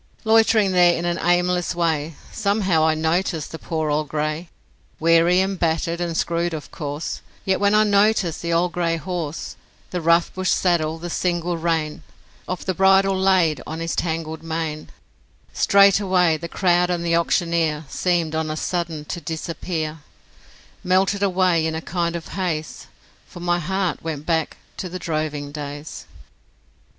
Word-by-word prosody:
Loitering 220 -2 +4
there 175 -1 +5
in 170 - -3
an 175 0 -1
aimless 175 0 +1
way 160 -2 -1 0.2
Somehow 200 -6 +1
I 160 - +2
noticed 160 0 -1
the 160 - -7
poor 160 -2 -2
old 150 +1 0
grey, 155 +3 -2 0.5
Weary 165 +3 +4
and 190 -1 -2
battered 165 +1 0
and 170 -2 -2
screwed, 170 0 0
of 150 - -8
course, 145 +1 -5 0.2
Yet 190 -1 +1
when 205 +1 +3
I 215 - +6
noticed 200 -5 +2
the 170 - -2
old 170 +1 +2
grey 170 -2 0
horse, 170 -2 -5 0.3
The 180 - -2
rough 170 +1 +3
bush 185 -1 -1
saddle, 165 -3 +1
and 175 +1 -6
single 175 0 -1
rein 160 -2 -1 0.5
Of 180 - -4
the 185 - 0
bridle 195 +1 +4
laid 185 -5 +2
on 160 +1 -5
his 165 0 -2
tangled 160 -1 -3
mane, 160 -1 -4 0.6
Straightway 195 -4 +4
the 170 +2 -6
crowd 180 -1 +2
and 175 -1 -1
the 170 0 +2
auctioneer 165 -2 +1
Seemed 170 0 0
on 160 0 -1
a 155 - -3
sudden 165 -4 -3
to 175 - -5
disappear, 160 0 -4 0.8
Melted 190 +2 +2
away 180 -4 +2
in 160 - -3
a - - -2
kind 170 0 -2
of 170 - -6
haze, 165 -5 -3 0.4
For - - -11
my 175 0 0
heart 185 0 -1
went 155 -2 -5
back 160 -2 0 0.2
to 185 - -4
the 180 - -5
droving 155 -4 -3
days. 145 0 -7
170 Hz, 160 wpm, -22 LUFS, 160-180 Hz, 0.8 s, I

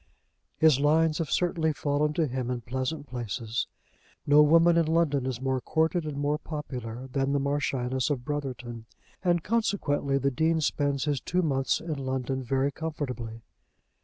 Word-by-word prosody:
His 155 -4 +5
lines 155 +2 +3
have 160 -4 -2
certainly 165 -3 +1
fallen 145 +1 0
to 165 0 +1
him 130 -2 -3
in 125 -1 -2
pleasant 130 +6 -3
places. 120 -2 -3 0.6
No 145 +1 +7
woman 165 +3 +6
in 165 -2 +3
London 155 -5 +2
is 125 -3 -3
more 130 -1 -1
courted 160 +3 +1
and 150 -2 -4
more 145 +1 0
popular 130 -6 -6
than 135 +1 0
the 140 - +2
Marchioness 135 -2 0
of 130 -4 -2
Brotherton, 125 -6 -5 0.4
and 175 -3 +2
consequently 185 -11 0
the 140 0 +1
Dean 160 +5 +2
spends 145 -2 0
his 145 -3 0
two 180 +1 0
months 135 -4 +1
in 155 -4 -4
London 130 0 -2
very 135 +2 0
comfortably. 125 -8 -5
140 Hz, 160 wpm, -28 LUFS, 130-160 Hz, 0.6 s, No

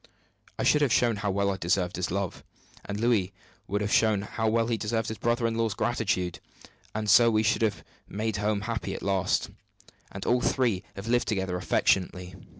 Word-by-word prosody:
I - - -2
should 150 - +4
have 140 -5 +2
shown 115 -2 +3
how 100 0 -2
well 100 +1 +1
I 95 - -3
deserved 90 0 0
his 90 -1 -2
love, 95 -1 -3 0.4
and 100 0 -5
Louis 110 -5 +1 0.3
would 105 +1 -1
have 105 0 -1
shown 110 -3 +3
how 110 +1 -2
well 115 +1 +2
he 115 0 0
deserved 110 0 -2
his 110 - -6
brother 120 0 0
in 115 - +1
law's 115 -3 -1
gratitude; 105 -7 -1 0.6
and 110 0 -2
so 115 +3 +7
we 110 -1 +2
should 110 0 +1
have 105 -3 0 0.3
made 110 +1 -2
home 105 0 0
happy 115 0 -3
at - - -7
last, 95 -2 0 0.6
and 95 - -7
all 125 +1 +2
three 120 -8 +1
have 100 +3 -7
lived 120 +1 +2
together 95 -3 -1
affectionately. 90 0 0
105 Hz, 195 wpm, -27 LUFS, 95-115 Hz, 0.6 s, so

